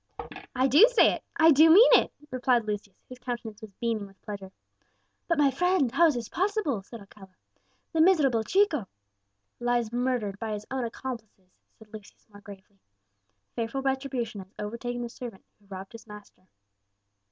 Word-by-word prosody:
"I 260 +1 +2
do 300 - +7
say - - +5
it - - -7
I 325 0 +6
do 315 +3 +6
mean 405 +9 +8
it," - - +4 0.2
replied 250 -2 +1
Lucius, 205 -2 -5
whose 255 0 -12
countenance 235 -3 -6
was 220 - -9
beaming 225 -4 -2
with 195 -1 -21
pleasure. 200 -2 -8 0.8
"But, 335 - +1
my 285 -2 +4
friend, 360 -3 +1
how 330 +6 +5
is 300 - +1
this 235 -2 -4
possible?" 380 - -1
asked 195 - -19
Alcala; 200 -3 -14 0.6
"the 320 - +2
miserable 300 -10 +4
Chico 320 - +1 0.4
" - - -51 0.3
"Lies 240 -2 0
murdered 240 -5 -1
by 220 -1 -4
his 210 0 -6
own 260 -2 -2
accomplices," 225 -6 -8 0.3
said 220 -1 -19
Lucius 215 -2 -13
more 205 0 -15
gravely; 200 0 -14 0.8
"fearful 235 +4 -3
retribution 265 -6 -3
has 190 0 -15
overtaken 240 +3 -5
the - - -4
servant 230 -4 -10
who 205 - -27
robbed 190 0 -9
his 230 -1 -13
master." 210 -3 -14
235 Hz, 170 wpm, -27 LUFS, 210-270 Hz, 0.8 s, mean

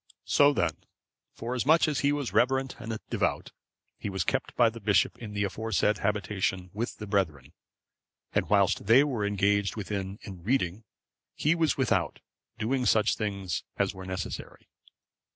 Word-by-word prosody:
So 145 0 +5
then, 85 - 0 0.6
forasmuch 125 +8 +2
as 150 -3 0
he 140 - +2
was 145 -3 -2
reverent 130 +1 +2
and 110 0 -4
devout, - - -1 0.5
he - - -4
was 95 -2 -1
kept - - -2
by 115 -2 +4
the 115 - -9
bishop 100 -2 +2
in 110 -3 -7
the 100 0 0
aforesaid 105 +1 0
habitation 95 -3 -1
with 115 +4 -3
the 105 - -6
brethren, 80 -8 -1 0.8
and - - 0
whilst 100 -1 +2
they 120 +6 +7
were 120 -8 -1
engaged 100 0 +1
within 100 -2 -4
in 95 -4 -9
reading, 105 -1 0 0.5
he 155 - +2
was 165 -3 +1
without, 100 - +1 0.4
doing 125 +3 0
such 110 -1 +3
things 100 -7 -3
as - - +1
were 95 0 -9
necessary. 95 -1 -6
105 Hz, 150 wpm, -28 LUFS, 95-120 Hz, 0.8 s, they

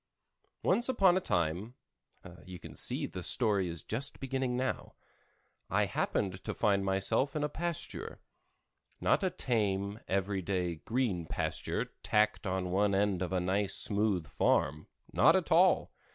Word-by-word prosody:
Once 240 +2 +3
upon 195 -8 +4
a - - +3
time 90 - -1 0.7
(you 90 -1 -8
see - - -2
the - - -6
story 100 -4 +2
is 85 -3 -6
just 130 +6 -3
beginning 130 -2 -2
now) 130 +1 -3 0.7
I - - +2
happened 95 -2 -2
to - - -4
find 100 -2 +2
myself 95 +9 0
in 150 - -1
a 150 - 0
pasture; 170 +2 -4 0.8
not - - +2
a 190 - +2
tame, 105 - -1
every 95 0 -1
day, 90 -2 -2
green 105 -5 -1
pasture - - -2 0.2
tacked 105 -1 +1
on 90 -1 -2
one 100 +1 +2
end 100 -2 +1
of 90 - -2
a 95 - +1
nice 95 +3 0
smooth 100 -5 +2
farm—not 75 0 +1
at - - 0
all! - - +4
100 Hz, 140 wpm, -32 LUFS, 95-125 Hz, 0.8 s, upon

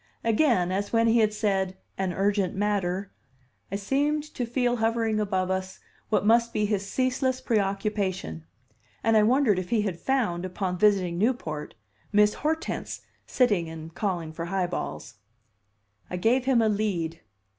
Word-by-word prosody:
Again, 230 - +2
as 200 +2 -2
when 230 0 +3
he 230 +1 +4
had 215 -1 +3
said 195 -3 -1 0.2
"an 190 -1 -1
urgent 195 0 0
matter," 200 -1 -1 0.6
I - - -1
seemed 285 +9 0
to 245 - -3
feel 245 0 +1
hovering 225 -1 +1
above 190 -3 0
us 190 0 -3 0.3
what 210 - +1
must 235 +2 +4
be 210 - +1
his 200 -1 -1
ceaseless 255 +1 0
preoccupation; 195 - -1 0.6
and 225 0 +3
I 215 - +6
wondered 225 -3 +3
if 180 -1 -6
he 220 -3 +2
had 185 -5 -3
found, 225 -11 0
upon 185 -1 -3
visiting 185 -4 +3
Newport, 165 -10 -1 0.4
Miss 210 0 +4
Hortense 320 +2 -2 0.3
sitting 205 -10 +2
and 160 0 -9
calling 175 -6 -2
for 165 +1 -4
"high 185 +1 0
balls." 75 - -5 0.9
I 180 - -3
gave 240 +7 +2
him 255 -4 +4
a - - +3
lead. 195 -6 -1
205 Hz, 155 wpm, -26 LUFS, 185-230 Hz, 0.9 s, I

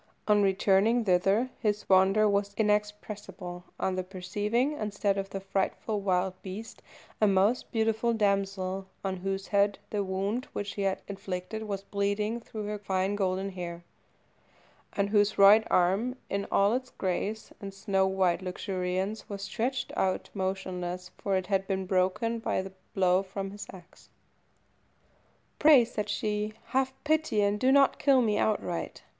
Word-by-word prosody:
On 210 -1 +5
returning 200 +4 +3
thither 195 +7 +2
his 210 -2 -1
wonder 195 +3 +5
was 200 0 0
inexpressible 210 -4 -2
on 185 -1 -1
perceiving, 205 +8 -1
instead 205 -6 -1
of 195 0 -3
the 195 - -4
frightful 195 +2 -2
wild 185 -1 +1
beast, 205 +4 -8 0.4
a 215 - +6
most 200 +5 +2
beautiful 225 0 +1
damsel, 195 -3 0 0.2
on 190 -1 -1
whose 195 +1 -3
head 200 0 +3
the 205 -1 0
wound 195 +6 -2
which 205 -1 -4
he 200 - -4
had 195 -1 -1
inflicted 195 +2 -5
was 195 -1 -3
bleeding 205 +3 -1
through 220 -2 -7
her 210 0 -4
fine 190 0 0
golden 190 0 -1
hair, 175 -2 -6 1.1
and 200 0 0
whose 205 0 +3
right 205 +3 +7
arm, 195 +8 +2 0.2
in 200 0 -1
all 200 +2 +4
its 255 +1 -2
grace 205 +3 -3
and 200 -1 -6
snow 195 -1 +1
white 190 -2 +1
luxuriance, 185 +2 -3
was 200 -1 -5
stretched 245 +6 -2
out 185 -1 -1
motionless, 185 -2 -3
for 195 -1 -1
it 185 -1 0
had 195 0 0
been 190 -2 -1
broken 190 +5 +1
by - - -1
the 190 0 -9 0.2
blow 185 -1 +4
from 195 0 -5
his 205 +1 -8
axe. 185 -1 -16 1.5
"Pray," 295 -6 +7
said 210 -3 -4
she, 210 +1 -1 0.2
"have 265 0 +1
pity, 310 -8 +1
and 205 +1 +1
do 260 +3 +3
not 275 0 +4
kill 270 -3 +4
me 210 -2 +1
outright. 190 -5 -1
200 Hz, 150 wpm, -29 LUFS, 190-215 Hz, 1.5 s, right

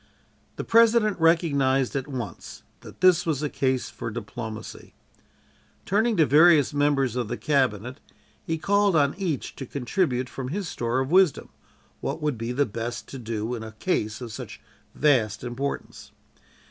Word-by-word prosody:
The - - -4
President 225 -3 +4
recognized 140 -6 +2
at 135 0 -2
once 120 -10 -7 0.2
that - - -14
this 185 -2 +5
was 155 -3 -1
a 150 - -1
case 130 -2 0
for - - -6
diplomacy. 110 0 -7 0.9
Turning 220 +2 +1
to 160 - +5
various 155 -1 +5
members 145 -4 +1
of 125 -3 -1
the 120 - -4
cabinet, 130 -3 0 0.4
he 165 - -2
called 200 +2 +2
on 145 -2 +3
each 180 -7 -3
to 135 - -6
contribute 130 -1 -1
from 130 +1 -6
his 185 +6 -3
store 120 -2 -1
of 130 +3 -3
wisdom, 185 -5 +3 0.5
what - - -3
would 150 -3 -1
be 115 +1 -4
best 120 -3 -2
to 135 - -7
do 115 0 -3
in 120 - -4
a 110 -1 -8
case 110 -3 -2
of 120 -2 -6
such - - -8 0.4
vast 115 -8 +2
importance. 125 +3 -5
135 Hz, 155 wpm, -25 LUFS, 120-165 Hz, 0.9 s, this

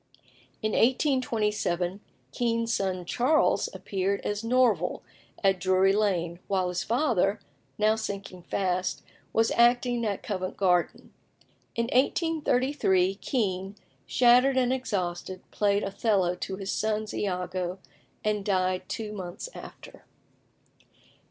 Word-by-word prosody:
In 215 - +1
1827, 215 - +1 0.3
Kean's 230 -1 0
son 185 -2 -1
Charles 255 - +2
appeared 195 0 -2
as 205 +1 -3
Norval 245 -1 +2 0.4
at 195 -1 +3
Drury 185 +1 +3
Lane, 175 -5 0
while 185 -2 0
his 180 0 -2
father, 225 -5 +1 0.4
now 215 +1 +3
sinking 200 -4 -6
fast, 185 0 -1 0.3
was 225 0 +2
acting 240 0 +3
at 205 -3 -2
Covent 185 -3 -4
Garden. 180 -3 +1 0.6
In 235 - +1
1833 260 - +2
Kean, 195 -6 -1 0.3
shattered 250 +2 +5
and 255 0 +3
exhausted, 185 -7 -3
played 205 0 +1
Othello 195 -3 +1
to 190 +2 -5
his 195 0 -4
son's 215 0 -1
Iago, 180 -1 -2 0.5
and 210 -1 0
died 185 -2 0
two 215 -2 -4
months 185 - -6
after. - - -12
205 Hz, 110 wpm, -27 LUFS, 185-235 Hz, 0.6 s, shattered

